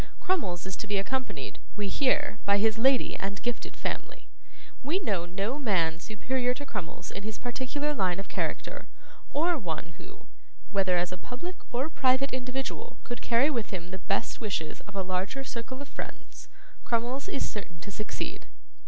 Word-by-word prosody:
Crummles 190 - +1
is 190 0 -2
to 215 - -4
be 205 -1 +2
accompanied, 195 - -1 0.2
we 205 -1 +1
hear, 280 +2 +3
by 200 0 +5
his 220 +2 +4
lady 265 +2 +5
and 200 +1 -2
gifted 240 -1 -2
family. - - -3 0.5
We 295 +7 +2
know 195 - +1
no 200 +10 0
man 170 - +3
superior 250 +6 +1
to 285 - -5
Crummles 210 -10 -4
in 200 - -4
his 215 +1 -3
particular 265 +4 -1
line 185 -7 +2
of 195 - -4
character, - - -2 0.4
or 330 +2 +3
one 170 -4 -3
who, 400 +3 -12 0.5
whether 190 -3 +4
as 175 +1 +2
a 185 - -4
public 300 - -5
or 255 +4 +1
private 265 -3 +3
individual, 255 +1 -2
could 240 - -4
carry 245 +6 +5
with 235 -7 0
him 180 -2 -4
the 190 - -4
best 195 +5 0
wishes 185 -8 -1
of 210 - -10
a 195 - +1
larger 185 +8 0
circle 260 +2 -4
of - - -12
friends. - - -7 0.4
Crummles 240 +4 +1
is 275 - 0
certain 190 -5 -6
to 200 - -6
succeed. 215 +2 -3
225 Hz, 170 wpm, -30 LUFS, 190-265 Hz, 0.5 s, by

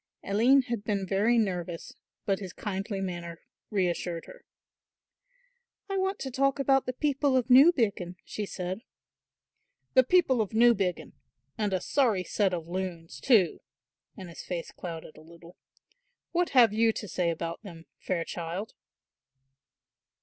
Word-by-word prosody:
Aline 240 +7 +4
had 235 -4 -4
been 205 -2 -1
very 205 +6 +2
nervous, 180 -6 -2 0.3
but 195 -1 0
his 190 -4 -7
kindly 195 0 -4
manner 175 -3 -5 0.3
reassured 175 -4 -1
her. - - -14 1.4
"I 390 - -1
want 385 +1 0
to 265 - -4
talk 275 +1 +1
about 270 -1 +2
the 255 - -1
people 280 -1 +1
of 250 0 -1
Newbiggin," 235 - +5
she 210 -1 -5
said. 185 +3 -5 1.1
"The 260 - +7
people 265 -5 +3
of 215 0 -4
Newbiggin! 215 -7 +2 0.4
and 210 -2 -1
a 185 - +1
sorry 225 -5 +1
set 195 +2 0
of 170 -2 -4
loons, 175 -2 -5
too!" 215 -9 +3 0.6
and 190 -3 -8
his 170 - -9
face 175 -2 -5
clouded 165 -3 -8
a - - -13
little. 170 +2 -15 0.8
"What 350 0 +1
have 240 -5 +5
you 225 +1 +3
to 210 - -6
say 180 -2 0
about 165 0 -4
them, 170 -6 -11
fair 175 -3 -2
child!" 175 +5 -5
200 Hz, 140 wpm, -28 LUFS, 175-250 Hz, 1.4 s, The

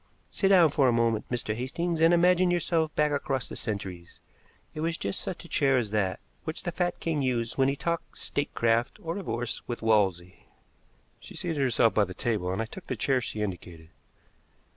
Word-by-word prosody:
Sit 195 - +1
down 180 -5 +6
for 140 -2 +3
a - - +4
moment, 115 -2 +1
Mr. 120 -3 -1
Hastings, 160 +7 -2
and 165 +1 +6
imagine 180 +1 +4
yourself 165 -2 +1
back 150 0 +2
across 135 -3 -1
the - - -7
centuries. 95 -5 -5 0.5
It - - -7
was 165 +2 -1
just 100 - -3
such 175 - -5
a - - -10
chair 135 -4 +3
as 110 -5 -1
that 95 -3 0 0.2
which 160 - -5
the 175 - -2
fat 175 0 -1
king 160 -3 -1
used 120 -3 -1
when 135 -1 +3
he 135 - +1
talked 170 +3 -3
statecraft 115 -4 0
or 165 0 -2
divorce 120 - -3
with 120 -2 -5
Wolsey." 95 -5 +1 0.7
She - - -12
seated 155 -4 -2
herself 120 -3 +3
by 105 - +3
the 95 -1 -9
table, 105 -6 -1
and 95 +4 -1
I - - -4
took 175 +10 -11
the - - -2
chair 130 -2 +1
she 110 -2 -3
indicated. 85 -4 -7
130 Hz, 195 wpm, -28 LUFS, 110-165 Hz, 0.7 s, down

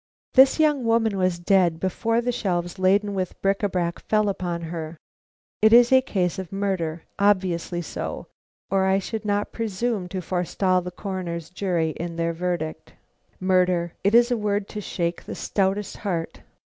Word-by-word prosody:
This 265 +3 +6
young 300 -4 +3
woman 225 -2 +2
was 185 -2 +1
dead 175 -2 +2
before 225 +6 0
the 245 +1 0
shelves 180 -6 -2
laden 200 +2 +3
with 185 -2 -3
bric 195 0 +1
à 205 -2 -1
brac 170 -2 -1
fell 215 -1 +1
upon 175 -3 -3
her. 160 -1 -6 0.6
It 220 +1 +6
is 240 +1 +7
a 260 0 +7
case 185 -8 -1
of 185 -3 -7
murder; 185 -5 -2 0.2
obviously 185 -3 +1
so, - - -5 0.5
or 195 -1 +3
I 190 0 +3
should 215 +2 -4
not 205 0 0
presume 225 -2 -2
to 185 +1 -4
forestall 180 +1 0
the 180 - -5
Coroner's 180 -3 -5
jury 175 -4 0
in 170 +1 -5
their 165 0 -1
verdict." 170 -2 -4 0.5
Murder! 180 -2 +2
it 200 +3 +3
is 240 +1 +5
a 245 - +2
word 205 -1 -1
to 210 - -5
shake 170 -3 -3
the - - -6
stoutest 195 0 -1
heart! 175 -5 -3
190 Hz, 170 wpm, -24 LUFS, 175-210 Hz, 0.6 s, is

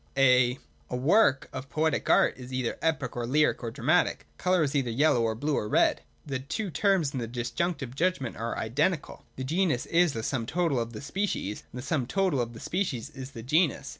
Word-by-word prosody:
A 125 -2 +5 0.3
work 135 - +3
of 130 +1 -6
poetic 155 +1 0
art - - +4
is 125 0 -10
either 130 -2 -1
epic 155 -6 -1
or 120 -1 -3
lyric 150 +4 +2
or 120 - -3
dramatic. 140 +8 +1
Colour 180 -2 +2
is 140 -1 -1
either 135 -4 +1
yellow 125 +1 +3
or 115 -1 0
blue 145 +5 -1
or 105 - -2
red. - - +3 0.2
The 135 -3 -3
two 185 +9 -4
terms 190 -6 +2
in 130 - -2
the 115 - -3
Disjunctive 125 +4 -3
judgment 155 -4 -1
are 115 +2 -3
identical. 150 +8 -1
The 130 - -5
genus 160 -2 +1
is 170 -2 +3
the 115 - -4
sum 115 -2 -2
total 165 -5 +1
of 115 0 -4
the 110 - -7
species, 145 - -3
and - - -9
the 125 - -7
sum 140 -5 -1
total 185 -6 +1
of 120 0 -4
the 115 - -10
species 170 - -2
is 130 0 -8
the 115 -4 -8
genus. 155 +4 +1
135 Hz, 205 wpm, -28 LUFS, 120-160 Hz, 0.3 s, A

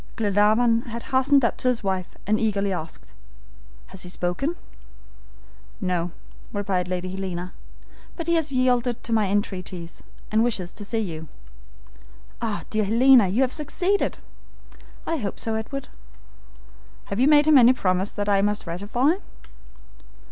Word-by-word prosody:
Glenarvan 220 +3 +3
had 235 0 -6
hastened 270 0 +4
up - - 0
to - - -2
his 245 -3 +1
wife 190 -2 -2
and 215 +1 +1
eagerly 200 -3 0
asked: 100 - -7 0.7
"Has 190 - -7
he 180 - -3
spoken?" 180 - -2 1.2
"No," 180 -3 -1 0.4
replied 195 -3 -1
Lady 180 0 -3
Helena, 185 -2 -5 0.6
"but 335 - -5
he 340 - +1
has 320 -3 +1
yielded 250 -2 +1
to 230 - -2
my 215 -2 +3
entreaties, 185 -3 -3 0.3
and 220 +1 +3
wishes 190 -7 -1
to 205 - -7
see 225 +3 -2
you." 160 -6 -5 1.1
"Ah, 220 -3 -2
dear 215 -1 +1
Helena, 235 +1 +6
you 215 +9 +2
have 255 - 0
succeeded!" 355 +6 0 0.9
"I 330 - -1
hope 205 -8 -4
so, 225 - 0
Edward." 240 +5 -4 1.3
"Have 200 - -2
you 260 - +4
made 295 -1 +6
him 305 -3 +7
any 240 0 +7
promise 185 -4 0
that 205 -1 -3
I 200 -1 +3
must 205 +1 0
ratify?" 215 - 0
215 Hz, 145 wpm, -24 LUFS, 185-250 Hz, 1.3 s, him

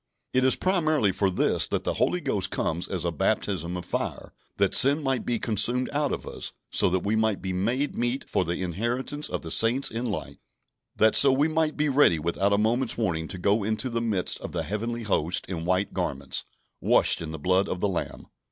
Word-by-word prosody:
It 130 - +2
is 130 - +5
primarily 155 - +1
for 95 +1 0
this 90 - +2
that - - -2
the - - -1
Holy - - 0
Ghost - - 0
comes 85 +2 -2
as 90 -3 -4
a 85 - 0
baptism 85 +2 -1
of 90 - -7
fire: - - -4 0.2
that - - +1
sin 140 +3 +6
might 135 -3 -1
be 120 - +1
consumed 120 +4 +1
out 145 -1 0
of - - -4
us, - - -6 0.2
so - - +3
that 90 0 -1
we 105 +2 +1
might 110 -2 +1
be 95 -1 -4
"made 120 +10 -1
meet 120 +3 -2
for - - 0
the 85 +2 -3
inheritance 120 - -2
of - - -4
the 80 - -7
saints 120 +8 +3
in 120 +2 -3
light"; 105 - -5 0.6
that 110 0 +3
so 140 - +7
we 140 +4 +2
might 160 -1 -1
be 150 0 +1
ready 135 - +4
without 85 +6 -1
a 100 - +3
moment's 115 +4 +1
warning 85 -8 -1
to 95 - -6
go 100 +4 +1
into 110 +5 -2
the 115 0 -1
midst 105 -6 0
of - - -7
the - - -2
heavenly 115 +3 -4
hosts 90 -5 0
in 85 -3 -5
white 95 +3 0
garments, 70 -1 -2 0.3
"washed - - +3
in 80 - -5
the 80 - -6
blood 95 +5 +1
of 90 - -3
the 100 - +1
Lamb." 95 -3 -4
110 Hz, 215 wpm, -26 LUFS, 90-130 Hz, 0.6 s, so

